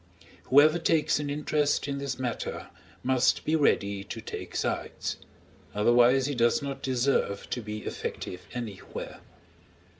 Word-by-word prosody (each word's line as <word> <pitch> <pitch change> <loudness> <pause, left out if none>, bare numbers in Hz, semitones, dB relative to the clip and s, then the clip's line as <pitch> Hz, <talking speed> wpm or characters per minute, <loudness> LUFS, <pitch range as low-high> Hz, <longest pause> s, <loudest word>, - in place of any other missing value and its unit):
Whoever 155 +5 +6
takes 160 -3 +2
an 145 -1 -3
interest 145 0 0
in 140 -1 -2
this 140 -1 -3
matter, 125 -2 -4 0.3
must 130 0 +2
be 155 - +2
ready 100 -9 +2
to - - -6
take - - -7
sides; - - -2 0.6
otherwise 120 +5 +5
he 145 - -1
does 120 -2 +3
not 140 -1 -5
deserve 130 -6 0
to 120 - -2
be 105 0 -6
effective 90 - -5
anywhere. 115 -6 -6
130 Hz, 130 wpm, -28 LUFS, 120-145 Hz, 0.6 s, Whoever